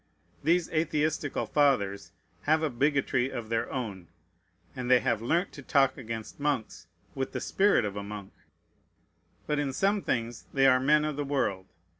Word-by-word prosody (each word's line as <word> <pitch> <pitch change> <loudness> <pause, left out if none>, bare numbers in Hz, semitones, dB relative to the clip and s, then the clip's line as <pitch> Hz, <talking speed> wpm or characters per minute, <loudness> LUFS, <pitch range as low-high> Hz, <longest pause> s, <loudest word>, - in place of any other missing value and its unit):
These 170 +2 +3
atheistical 155 -2 0
fathers 125 -10 +1 0.3
have 155 +1 +3
a 155 - 0
bigotry 135 -1 +1
of 110 -2 -6
their 115 0 -1
own; 105 -9 -5 0.7
and 125 -1 -4
they 125 -1 +7
have 110 - 0
learnt 170 +11 0
to 140 - -10
talk 135 0 +3
against 115 -1 -7
monks 140 -6 -2 0.3
with 135 -1 -3
the - - -2
spirit 195 - +2
of 100 -1 -4
a 100 - -3
monk. 100 -1 -8 1.1
But 150 -1 0
in 145 -2 -1
some 200 +6 +1
things 115 -5 -3
they 135 0 +4
are 130 -1 +6
men 150 +3 +3
of 150 -2 -3
the 145 - -1
world. 125 -10 -1
135 Hz, 165 wpm, -29 LUFS, 115-150 Hz, 1.1 s, they